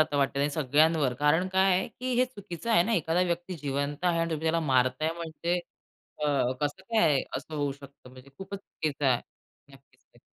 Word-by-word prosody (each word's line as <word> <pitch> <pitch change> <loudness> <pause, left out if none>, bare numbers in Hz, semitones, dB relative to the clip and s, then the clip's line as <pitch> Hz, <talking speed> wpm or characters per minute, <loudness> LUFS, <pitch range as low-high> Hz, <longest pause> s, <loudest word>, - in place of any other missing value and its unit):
आता 155 -2 +2
वाटतं, 140 +1 +1
सगळ्यांवर. 150 0 +2
कारण 155 +5 +3
काय 190 0 +3
आहे, 185 +1 +1
की 255 0 -4
हे 255 - +5
चुकीचं 210 -4 -7
आहे 220 -6 +6
ना? 225 +6 -1
एखादा 170 -3 +1
व्यक्ती 175 +1 -2
जिवंत 145 +1 -3
आहे 175 -2 +2
आणि 165 0 -1
तुम्ही 160 0 -3
त्याला 165 +1 +2
मारताय 130 +4 +2
म्हणजे, 170 +1 -2 0.6
अ, 150 - -1 0.3
कसं 145 +4 -2
काय 225 +4 -1
आहे 145 -4 +3
असं 140 +4 -7
होऊ 145 -2 -1
शकतं 140 -2 -15
म्हणजे? 130 +1 -15
खूपच 195 +1 -6
चुकीचं 150 -6 -4
आहे. 125 -2 +3 0.5
नक्कीच - - -21
तर. - - -20
160 Hz, 190 wpm, -28 LUFS, 140-180 Hz, 0.6 s, आहे